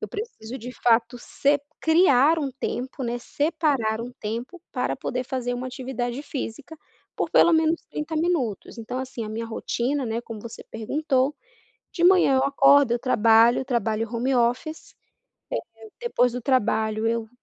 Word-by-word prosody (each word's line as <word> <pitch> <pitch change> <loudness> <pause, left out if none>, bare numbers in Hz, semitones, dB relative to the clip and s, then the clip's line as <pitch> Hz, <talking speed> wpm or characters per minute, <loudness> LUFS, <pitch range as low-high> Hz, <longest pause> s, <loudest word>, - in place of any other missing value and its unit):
eu - - -5
preciso, 270 - -7
de 245 +3 -7
fato, 235 +1 +3
se 285 +4 +1 0.2
criar 320 -2 +4
um 285 -3 -2
tempo 260 +2 -4
né, 240 -1 -2
separar 285 -6 0
um 245 - -7
tempo 235 +11 -5
para 250 -1 -1
poder 255 -1 -3
fazer 245 -1 -3
uma 250 +1 -4
atividade 255 0 -4
física 290 +2 -6 0.4
por, - - -2
pelo - - +6
menos, 320 0 +2
30 305 +2 -4
minutos. 310 - -1
Então, 235 +3 -5
assim, 255 -3 -5
a 215 - -6
minha 225 +1 -4
rotina, 245 +4 -2
né, 230 0 -2
como 225 -2 -8
você 230 +1 -9
perguntou, 270 +4 0 0.6
de 340 - -2
manhã 360 -6 +6
eu 260 - +3
acordo, 275 -1 +5
eu 240 - +1
trabalho, 230 0 +4
trabalho 225 -3 -1
home 255 +3 0
office, 250 +7 -1 0.8
eh, 225 0 -13
depois 250 - +1
do 245 - -4
trabalho 220 -3 +1
eu 230 -1 -1
250 Hz, 160 wpm, -24 LUFS, 230-285 Hz, 0.8 s, pelo